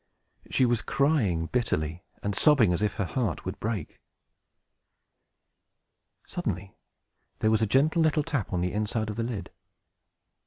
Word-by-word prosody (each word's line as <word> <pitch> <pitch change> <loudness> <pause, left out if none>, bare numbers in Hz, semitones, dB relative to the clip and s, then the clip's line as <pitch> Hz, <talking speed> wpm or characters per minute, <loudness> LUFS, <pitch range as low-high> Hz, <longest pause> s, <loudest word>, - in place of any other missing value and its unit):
She 130 - +3
was 120 -2 +2
crying 120 - +1
bitterly, 85 -7 -1 0.2
and 100 - -1
sobbing 120 - +5
as 85 - -1
if 105 -1 0
her 100 - -1
heart 115 +5 -2
would - - -5
break. 110 -7 -4 2.3
Suddenly 95 +2 -4 0.6
there 110 - +2
was 110 0 +3
a 110 - +3
gentle 150 - +3
little 155 -1 +3
tap 140 -8 -2
on 90 - 0
the 90 0 -1
inside 105 +1 -1
of - - -6
the 115 - -2
lid. 115 -4 -4
110 Hz, 145 wpm, -28 LUFS, 95-130 Hz, 2.3 s, sobbing